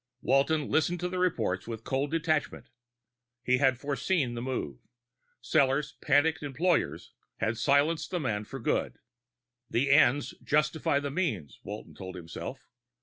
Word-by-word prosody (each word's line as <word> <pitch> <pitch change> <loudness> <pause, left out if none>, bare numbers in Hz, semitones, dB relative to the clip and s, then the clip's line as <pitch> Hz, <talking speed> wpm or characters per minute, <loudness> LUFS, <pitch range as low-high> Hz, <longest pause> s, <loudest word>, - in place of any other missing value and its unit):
Walton 140 +3 +2
listened 175 +3 +1
to 180 - -1
the 185 0 -3
reports 115 - 0
with 115 -1 -6
cold 135 +4 -1
detachment. 160 -1 -1 0.7
He 125 0 +2
had 135 -3 +3
foreseen 140 0 0
the 120 - -4
move: 120 - -3 0.6
Sellors' 140 +2 +2
panicky 150 +2 +3
employers 150 +6 0 0.2
had 110 +1 0
silenced 145 +6 +2
the 180 - -1
man 110 -8 -2
for 135 - -7
good. - - -1 0.7
The 135 +4 +1
ends 140 -1 +4
justify 150 -1 +1
the 145 -1 -4
means, 130 - -2
Walton 105 +2 -8
told 95 -1 -8
himself. 85 -2 -7
140 Hz, 140 wpm, -29 LUFS, 120-155 Hz, 0.7 s, ends